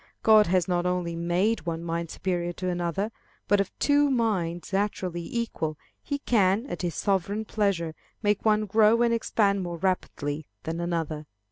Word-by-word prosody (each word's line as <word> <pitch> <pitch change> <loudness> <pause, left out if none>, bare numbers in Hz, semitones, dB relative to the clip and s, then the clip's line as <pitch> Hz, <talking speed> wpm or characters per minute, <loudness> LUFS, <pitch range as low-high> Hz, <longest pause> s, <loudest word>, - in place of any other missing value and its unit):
God 215 -1 +7
has 180 -1 +2
not 175 -1 +1
only 180 -2 -1
made 175 +5 0
one 165 0 -2
mind 170 0 -3
superior 175 -1 -2
to 185 +2 -4
another, 175 +4 -1 0.4
but 205 -1 +4
of 195 - -2
two 290 0 +3
minds 195 - -1
naturally 190 -3 -1
equal, 165 -6 -3 0.2
he 285 - -3
can, 215 -4 +2
at - - -5
his 175 -2 -2
sovereign 200 +2 0
pleasure, 195 -7 0 0.3
make 205 -1 +1
one 215 -1 +3
grow 220 +3 +4
and 235 -1 +3
expand 205 -3 +1
more 175 -2 -4
rapidly 155 -5 -2 0.2
than 165 +1 -3
another. 165 -3 -2
185 Hz, 160 wpm, -27 LUFS, 170-215 Hz, 0.4 s, God